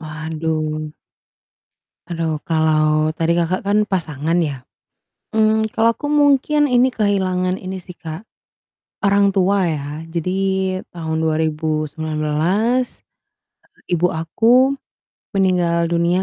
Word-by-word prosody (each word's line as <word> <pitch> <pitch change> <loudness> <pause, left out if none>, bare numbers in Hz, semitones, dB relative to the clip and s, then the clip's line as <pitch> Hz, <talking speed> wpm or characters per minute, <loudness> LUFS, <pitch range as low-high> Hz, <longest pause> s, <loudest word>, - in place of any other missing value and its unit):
Waduh. 155 0 -3 1.2
Aduh, 165 -3 -2
kalau 155 -1 +2
tadi 165 +1 +1
Kakak, 175 +2 0
kan 200 +1 +1
pasangan 160 -5 -2
ya, 140 -5 -4 0.7
mmm, 220 0 +3
kalau 230 +1 +3
aku - - -6
mungkin 290 0 +3
ini 250 +1 +3
kehilangan 185 -4 0
ini 185 0 -6
sih 180 0 -12
Kak, 160 +1 -7 0.8
orang 200 0 +3
tua 195 0 +2
ya 155 -4 -2 0.3
jadi 180 +3 -2 0.5
tahun 160 -2 -3
2019, 155 - -1 0.7
eee, 175 - -3
ibu 180 +2 +1
aku 240 +12 +3 0.6
meninggal 175 -3 +2
dunia, 170 +2 +2
170 Hz, 105 wpm, -19 LUFS, 155-200 Hz, 1.2 s, mmm